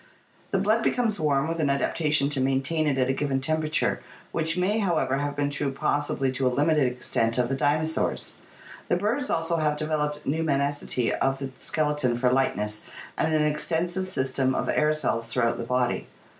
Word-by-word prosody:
The 195 - +1
blood 215 +4 +2
becomes 230 -4 +1
warm, 145 -2 +1
with 165 0 -3
an 150 -3 +2
adaptation 145 +1 +1
to 135 - 0
maintain 135 +4 +1
it 140 -2 +1
at 130 -1 +2
a 130 - +1
given 135 -1 -1
temperature, 155 +3 0 0.3
which 160 +1 0
may, 195 +5 +1
however, 170 -9 +1
have 145 0 -2
been 145 0 0
true 145 -1 -1
possibly 135 -1 0
to 130 0 0
a - - +4
limited 145 +1 +2
extent 115 -2 -1
of 125 -1 +1
the 135 - 0
dinosaurs. 155 +4 0 0.6
The 175 - +3
birds 230 +8 -1
also 165 +1 0
have 150 -2 +1
developed 150 -1 -2
pneumaticity 140 -4 0
of 135 0 0
the 135 -1 -5
skeleton 150 -6 0
for 125 0 +2
lightness 105 -5 0 0.3
and 160 - 0
an 155 -1 +3
ex 150 0 -1
tensive 175 +3 -1
system 130 -5 0
of - - -1
air 150 0 +3
cells 125 -7 -1
throughout 115 0 0
the 115 - -3
body. 125 0 0
145 Hz, 185 wpm, -26 LUFS, 130-160 Hz, 0.6 s, a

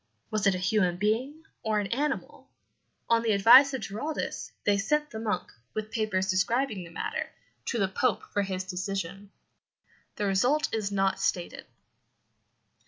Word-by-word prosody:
Was 215 -1 +1
it 195 - +4
a 185 0 -2
human 185 -4 +2
being 245 - -1 0.2
or 215 -1 0
an 205 - -1
animal? 280 +3 -2 0.6
On 230 0 +3
the 225 -2 +1
advice 240 +8 +8
of 265 - -3
Giraldus 285 +11 -4
they 205 - +3
sent 300 +8 0
the 220 - -5
monk, 210 -5 -2 0.2
with 215 0 -4
papers 205 -4 0
describing 200 +3 0
the 170 - -11
matter, 165 - -3 0.4
to 240 - -1
the 195 -3 +2
Pope 225 +5 0
for 205 - +2
his 190 -1 -3
decision. 195 +1 -4 0.9
The 205 - -2
result 250 +10 +2
is 215 -3 -1
not 195 -1 +1
stated. 180 -2 -2
210 Hz, 155 wpm, -28 LUFS, 190-235 Hz, 0.9 s, advice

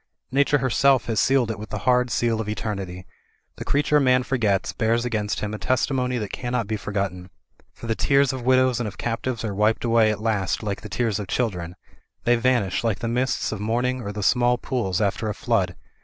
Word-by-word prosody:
Nature 140 +2 +3
herself 135 0 +3
has 110 -3 0
sealed 130 -4 +3
it 110 - -6
with 110 0 -8
the 105 - -3
hard 125 0 +3
seal 115 -2 0
of 105 - -5
eternity. 100 -4 -4 0.5
The - - -5
creature 150 +1 +2
man 130 -2 +3
forgets 110 -8 0
bears 115 +1 +1
against 105 -3 -2
him 105 0 -3
a 110 - -5
testimony 125 0 0
that 105 -4 -4
cannot 120 -2 -2
be 110 +2 -2
forgotten. 100 -3 -3 0.4
For - - -11
the 115 - 0
tears 140 +2 +2
of 130 - -5
widows 130 0 +3
and 120 - -2
of 105 - -8
captives 120 0 -3
are 105 - -3
wiped 105 +4 +1
away 115 -2 +4
at 105 - -1
last 105 -4 -1
like 100 -2 -3
the 105 - -9
tears 110 0 -1
of 100 - -5
children. 90 -7 -2 0.5
They 120 - +4
vanish 120 -6 +1
like 110 -3 0
the 115 - -4
mists 125 +3 0
of 110 - -4
morning 125 +4 -1
or 100 - -5
the 105 0 -5
small 125 +3 +3
pools 115 -7 -2
after 105 +2 0
a 105 - -3
flood. 95 -7 0
115 Hz, 210 wpm, -24 LUFS, 105-125 Hz, 0.5 s, away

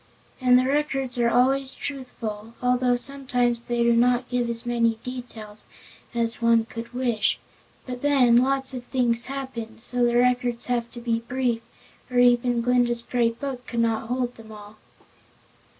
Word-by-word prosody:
And 250 -1 +6
the 255 - +2
records 270 -3 -1
are 235 -1 +3
always 265 +3 +2
truthful, 230 -5 -6
although 250 0 +2
sometimes 245 -2 -1
they 240 0 -1
do 235 0 +4
not 245 +1 +2
give 245 -1 0
as 230 +1 +2
many 235 -1 +1
details 235 -4 -8 0.5
as 230 0 -1
one 230 -1 +4
could 230 0 -8
wish. 245 -3 0 0.5
But 250 -1 -6
then, 265 -5 +4
lots 265 +1 +1
of 250 -1 -5
things 240 -2 0
happen, 265 -3 -5
and 225 0 -15
so 245 +1 0
the 240 0 +3
records 245 -1 +1
have 235 -1 -2
to 240 - -8
be 235 -1 -1
brief 240 0 -1 0.5
or 250 - -3
even 245 -1 +4
Glinda's 240 -1 +2
Great 230 -2 0
Book 265 -3 -5
could 235 -1 -1
not 225 -1 0
hold 245 0 -1
them 220 -1 -13
all. 210 0 -12
245 Hz, 165 wpm, -24 LUFS, 235-250 Hz, 0.5 s, And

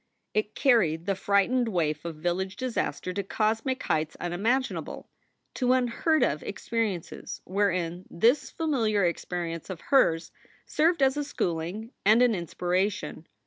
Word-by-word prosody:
It 215 0 -1
carried 175 - +3
the 200 - +1
frightened 200 +6 +2
waif 155 -5 -1
of 170 -2 -4
village 175 +4 -2
disaster 245 -7 -2
to 200 - -1
cosmic 220 +6 -1
heights 155 0 -1
unimaginable, 220 +10 -2 0.4
to 250 -1 +2
unheard 260 +6 +2
of - - +1
experiences 220 -7 -3
wherein 185 -2 -1
this 235 - +2
familiar 225 - +1
experience 170 -1 -3
of 185 -3 -5
hers 165 -12 +2 0.3
served 320 -1 +2
as 265 +1 +3
a 295 - 0
schooling 185 - -3
and 220 +5 +6
an 245 -2 +4
inspiration. 180 -2 -2
200 Hz, 130 wpm, -27 LUFS, 175-245 Hz, 0.4 s, and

